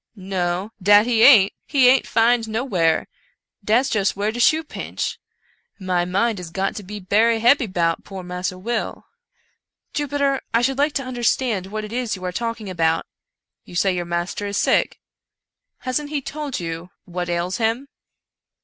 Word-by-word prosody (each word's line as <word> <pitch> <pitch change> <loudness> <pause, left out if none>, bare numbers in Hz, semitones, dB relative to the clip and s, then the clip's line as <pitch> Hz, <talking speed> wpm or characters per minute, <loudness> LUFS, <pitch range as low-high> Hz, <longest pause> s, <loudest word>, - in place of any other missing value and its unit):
" - - -57
"No, 185 0 -2
dat 205 +3 +6
he 235 -2 +2
aint! 215 -7 +7
— - - -49
he 265 -3 +6
aint 260 +1 +4
'fin'd 230 0 +2
nowhar 200 -9 +1 0.3
— - - -55
dat's 230 +6 +3
just 205 -6 0
whar 205 +2 -1
de 240 - -6
shoe 315 +6 +4
pinch - - -5 0.3
— - - -41
my 175 -1 +2
mind 200 +4 0
is 175 -2 -7
got 190 +3 -2
to - - -4
be 205 +2 -8
berry 220 +4 +2
hebby 240 +2 +4
'bout 170 -2 0
poor 190 -2 -8
Massa 180 +1 -4
Will." 235 +6 -3 0.5
" - - -52
Jupiter, 280 -1 0
I 235 - +3
should 270 +2 0
like 290 +1 +2
to 275 - -1
understand 240 -5 0
what 215 +2 -5
it 210 - -9
is 245 -3 -1
you 185 -1 -8
are 180 - -2
talking 230 +1 -4
about. 165 -3 0 0.6
You - - -13
say 190 +2 +2
your 175 -1 -2
master 175 +4 -3
is 200 0 -2
sick. - - +1 0.8
Hasn't 260 +4 -2
he 300 -1 -1
told 290 0 -5
you 165 +1 -5 0.2
what 175 0 -4
ails 175 +3 -1
him 230 +4 0
210 Hz, 185 wpm, -22 LUFS, 180-245 Hz, 0.8 s, aint